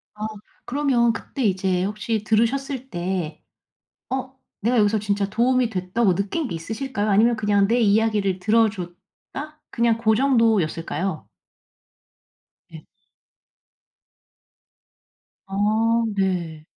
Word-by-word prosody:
아 210 0 -5 0.4
그러면 255 -4 +2
그때 270 +3 -5
이제 190 -3 +1
혹시 210 +2 -2
들으셨을 260 +5 0
때 175 -3 -3 0.7
'어 260 0 -4 0.2
내가 240 +4 +1
여기서 215 0 +3
진짜 200 -1 -1
도움이 245 +3 +2
됐다.'고 185 0 0
느낀 200 - -2
게 170 - -4
있으실까요? 215 +5 -3
아니면 225 +4 +4
그냥 205 -2 +2
내 235 +3 +2
이야기를 210 -3 +2
들어 220 +4 +3
줬다? 220 - -10
그냥 235 -1 +2
그 220 -1 +2
정도였을까요? 195 - +1 1.4
네. - - -12 2.6
아 220 +4 +1
네. 175 -5 -2
215 Hz, 225 characters per minute, -23 LUFS, 195-235 Hz, 2.6 s, 아니면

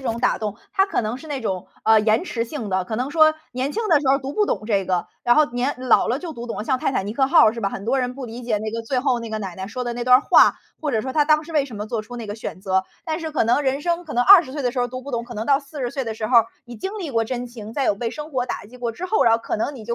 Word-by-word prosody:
这 - - -13
种 230 -1 -1
打 250 - +1
动， 210 -2 -4 0.2
它 385 -1 +3
可 395 - 0
能 215 +3 -3
是 310 +4 -12
那 280 -3 -3
种， 190 -5 -3 0.2
呃， 220 0 +6
延 220 - +2
迟 230 -9 -2
性 235 -3 -6
的。 185 -1 0
可 220 +3 -4
能 260 +4 -2
说 310 -1 +6 0.2
年 260 +3 -2
轻 445 +4 -2
的 310 -4 +5
时 280 - -1
候 275 +1 +4
读 270 +1 -6
不 420 - +2
懂 215 - -2
这 200 -4 +1
个， 180 -1 -1 0.2
然 240 - +4
后 305 - +6
年 250 +4 0 0.2
老 - - +5
了 250 +4 0
就 335 -2 -6
读 240 0 -8
懂 - - -4
了， - - -4
像 260 +2 +1
《泰 - - +1
坦 195 -6 -1
尼 210 - -3
克 265 +2 +1
号》 320 -8 +7
是 230 - -5
吧？ 195 - 0
很 195 0 -7
多 260 +3 +1
人 250 0 -2
不 260 -1 -7
理 235 +2 -8
解 225 -3 0
那 215 +1 -4
个 230 0 -3
最 255 +3 -1
后 250 -2 +1
那 230 - -7
个 220 - -2
奶 190 -4 -5
奶 190 +1 -6
说 250 +2 -4
的 240 - -2
那 240 0 -4
段 250 +1 +7
儿 260 - +1
话， - - +5 0.2
或 300 -2 -1
者 220 - +1
说 260 +4 -5
她 300 -2 +3
当 305 0 +3
时 330 - -10
为 295 -3 +2
什 245 -6 -9
么 210 - -5
做 220 0 -3
出 245 +3 -10
那 230 -2 -6
个 205 - -5
选 220 -4 -7
择。 190 -1 +1 0.2
但 320 +1 -3
是 320 - -4
可 300 - +1
能 240 +6 +2
人 270 +1 0
生 345 0 -1
可 310 - -7
能 245 +1 +2
20 360 -8 +8
岁 285 +2 -5
的 245 -2 0
时 250 - -1
候 245 - 0
读 255 0 -6
不 275 +1 -9
懂， 235 - -1
可 240 0 -10
能 215 +2 -4
到 280 0 +4
40 275 -3 -5
岁 270 - -2
的 225 -2 -3
时 215 0 -4
候， 240 0 +6 0.3
你 240 -1 -10
经 385 - -5
历 320 -8 -5
过 230 - +2
真 245 +1 -4
情， 225 -3 -9
在 275 +2 -1
有 - - +2
被 230 +3 -3
生 300 0 -8
活 250 -1 -1
打 - - -5
击 245 +5 -14
过 240 -1 -2
之 360 +11 -6
后， 435 +3 +2
然 230 - +4
后 230 - +4
可 230 - -3
能 270 +6 -2
你 220 - -10
就 235 - -2
245 Hz, 375 characters per minute, -22 LUFS, 220-280 Hz, 0.3 s, 20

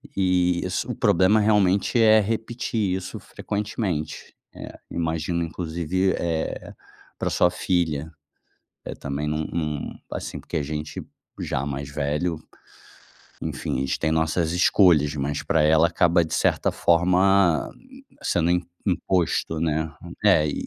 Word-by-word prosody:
E 90 -2 +2
isso 90 - -2
o - - -4
problema 95 +5 +4
realmente 105 +1 +2
é 110 -1 +6
repetir 110 -2 -1
isso 95 -1 -6
frequentemente, 100 -6 -4 0.2
eh, - - -10
imagino 85 +1 -1
inclusive, 85 +3 -1
eh, 80 -2 -3 0.4
pra - - -1
sua 90 - +3
filha, 80 -4 -1 0.7
eh, - - -6
também 70 +2 -4
num 75 +1 -1
num, 75 -3 -3 0.2
assim - - -5
porque - - -6
a 75 - +1
gente 75 0 -5 0.4
já 65 - -2
mais 70 -1 -4
velho, 75 +4 -2 1.0
enfim, - - -3
a - - -1
gente 65 - -2
tem 80 - 0
nossas 80 +1 +1
escolhas, 85 -4 +4
mas 70 0 -2
pra 80 - +2
ela 80 +2 +5
acaba 85 0 +3
de 80 - -6
certa - - +1
forma, 90 0 +3 0.5
sendo 85 0 +1
im 90 0 +1 0.2
imposto, 90 -4 0
né. 80 -1 0 0.4
É, 75 - +5
e 75 - -3
85 Hz, 135 wpm, -24 LUFS, 75-95 Hz, 1.0 s, é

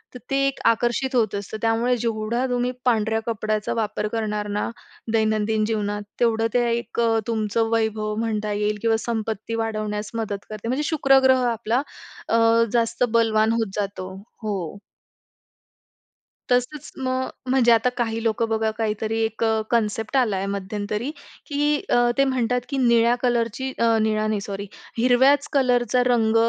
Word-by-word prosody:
तर 250 - -7
ते 275 - +1
एक 275 - -3
आकर्षित 240 +3 +1
होत 220 -4 +2
असतं. 200 +2 -5
त्यामुळे 230 +2 +2
जेवढा 230 +2 -1
तुम्ही 245 0 0
पांढऱ्या 220 -2 +2
कपड्याचा 215 -1 -1
वापर 215 -1 -2
करणार 210 -2 -2
ना - - -1 0.4
दैनंदिन 215 -1 +1
जीवनात 205 -2 -2 0.2
तेवढं 225 -1 +2
ते 245 - +3
एक 235 0 -3
अ, 225 -1 +3
तुमचं 225 0 0
वैभव 220 -1 0
म्हणता 215 -2 -1
येईल 210 0 0
किंवा 225 -1 +2
संपत्ती 225 -1 -3
वाढवण्यास 215 -2 -3
मदत 200 -2 -5
करते. 215 +1 -6
म्हणजे 265 +5 0
शुक्र 270 -4 +4
ग्रह 260 -1 +5
आपला 230 +3 0 0.5
अ, 230 0 +4
जास्त 235 +1 +1
बलवान 220 -1 +3
होत 225 -4 -1
जातो. 195 -2 -4 0.3
हो. 195 -4 -3 1.7
तसंच 250 +4 0
मग, 255 0 -1 0.2
म्हणजे 250 -2 +4
आता 230 +2 +4
काही 225 -1 -1
लोकं 225 0 +1
बघा 220 0 +1
काहीतरी 220 0 -1
एक 225 +1 -3
अ, 220 -1 +2
कन्सेप्ट 225 +2 0
आला 225 -6 +2
आहे 195 - -2
मध्यंतरी, 210 +6 -3 0.3
की 295 0 +1
अ, 240 0 +4
ते 275 - +5
म्हणतात, 250 -2 0
की 275 - -2 2.2
हिरव्याच 260 +4 +4
कलरचा 250 -2 +2
रंग 230 -3 +2
225 Hz, 140 wpm, -23 LUFS, 215-245 Hz, 2.2 s, ग्रह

